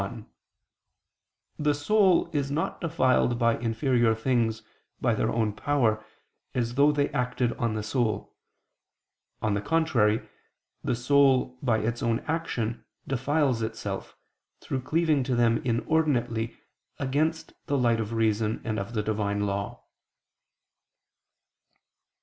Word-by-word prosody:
1: 105 +2 -6 1.3
The 150 -1 +2
soul 190 +5 +3
is 140 -1 0
not 150 +3 -2
defiled 130 -7 +2
by 115 -1 +3
inferior 115 0 +2
things, 115 -2 0 0.4
by - - +2
their - - 0
own 110 -2 0
power, 110 -3 +1 0.5
as 120 -2 -1
though 140 +3 +5
they 145 -1 +1
acted 125 -1 -1
on 115 -2 -1
the 105 - -2
soul: 110 -2 -1 1.1
on 110 -2 +1
the 100 - 0
contrary, 120 -8 +1 0.6
the - - 0
soul, 130 0 +3
by 120 -5 +2
its 115 +2 -2
own 115 0 0
action, 125 -8 -3 0.2
defiles 135 -1 +1
itself, 110 -3 -5 0.4
through 130 - -3
cleaving 155 0 +1
to 125 -1 -1
them 115 -1 +3
inordinately, 120 -3 0 0.4
against 155 +5 -1
the 140 - +1
light 120 -3 +2
of 110 0 -3
reason 110 -1 +1
and 110 -2 -2
of 100 +4 -6
the 105 - 0
Divine 105 -1 -1
law. 100 0 -3
120 Hz, 125 wpm, -27 LUFS, 110-140 Hz, 1.3 s, though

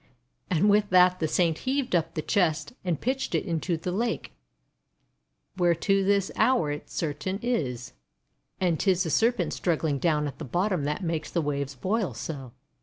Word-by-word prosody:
And 180 +3 +3
with 205 0 +4
that 180 0 +5
the 160 - +1
Saint 165 0 +1
heaved 260 -4 -1
up 165 - 0
the 155 - -2
chest, 165 0 +1
and 175 -5 -1
pitched 260 +2 -1
it - - +1
right - - -6
into 165 +1 -1
the 175 +3 -4
lake, 230 +5 -2 1.2
where 175 -2 +3
to 195 +3 +1
this 200 0 +2
hour 245 - +3
it 145 - -6
certain 160 +4 -3
is. 125 - -2 0.7
And 175 -4 +1
't 200 - +1
is 185 0 +3
the 160 - -3
Serpent 235 +6 +2
strug 170 -3 0
gling 145 -4 -1
down 150 -2 +1
at 145 - -6
the - - -5
bottom 175 - 0
that 150 +6 -2
makes 165 -2 -2
the 175 - -1
waves 140 -3 -2
boil 190 - -1
so. 135 -1 -6
175 Hz, 185 wpm, -27 LUFS, 150-195 Hz, 1.2 s, that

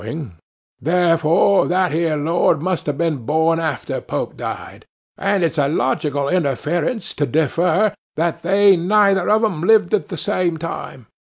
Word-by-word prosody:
(bowing). 150 - -6 0.5
Therefore, 170 +2 +2
that 185 -1 +1
ere 160 0 0
Lord 160 +1 +1
must 180 +1 -3
have 145 -2 -2
been 165 -2 0
born 160 +6 0
long 165 - -1
after 145 -5 -4
Pope - - -4
died. - - -7 0.3
And 195 -1 0
it's 165 -1 0
a 140 - +2
logical 145 -1 -1
interference 175 - -1
to 145 - -1
defer, 170 +7 +1 0.2
that 165 +1 -1
they 200 0 +4
neither 195 +1 +2
of 215 +1 +3
them 185 -8 -1
lived 210 0 +3
at 210 - 0
the 180 - -6
same 170 +2 -1
time. 155 -6 -7
165 Hz, 160 wpm, -19 LUFS, 155-185 Hz, 0.5 s, they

